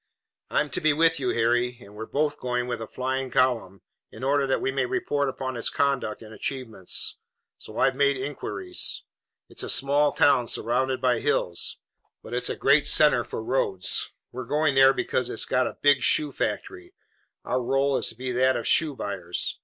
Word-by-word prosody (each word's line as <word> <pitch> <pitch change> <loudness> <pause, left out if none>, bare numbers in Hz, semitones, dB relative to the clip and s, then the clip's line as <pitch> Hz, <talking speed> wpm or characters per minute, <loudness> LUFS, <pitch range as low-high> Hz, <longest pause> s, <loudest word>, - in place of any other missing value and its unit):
"I'm - - 0
to - - -2
be 155 -1 +4
with 165 +1 +3
you, 130 -2 -1
Harry, 120 +1 +1
and 100 -4 -14
we're 110 +1 -7
both 150 0 -1
going 125 -1 -1
with 125 -2 -4
a 110 - -5
flying 130 +1 -3
column, 115 -7 0 0.3
in - - -10
order 140 +1 +2
that 135 - +1
we 135 - -1
may 130 -1 0
report 145 +1 -1
upon 130 -1 -5
its 115 - -1
conduct 135 -6 -1
and 110 0 -12
achievements. 110 -4 -4 0.4
So - - -9
I've - - +3
made 140 0 +2
inquiries. 145 - -3 0.4
It's - - -7
a - - -4
small 145 +2 +3
town 125 -4 +3
surrounded 130 +3 0
by 125 -3 +2
hills, 135 -12 -1 0.5
but - - -9
it's 125 - -1
a - - -2
great 140 +2 +3
center 150 -6 +4
for 110 - -6
roads. 95 -8 0 0.2
We're 130 0 -6
going 150 +3 +1
there 135 0 +7
because 125 -2 -1
it's 115 - -2
got 130 0 +1
a - - -7
big 145 -2 +5
shoe 150 -2 +2
factory. 370 - -4 0.5
Our 125 +1 0
role 135 +3 +1
is - - 0
to - - -9
be 125 +2 -4
that 130 +1 +2
of 115 - -5
shoe 155 -3 +2
buyers. 90 -6 -2
130 Hz, 190 wpm, -25 LUFS, 120-140 Hz, 0.5 s, there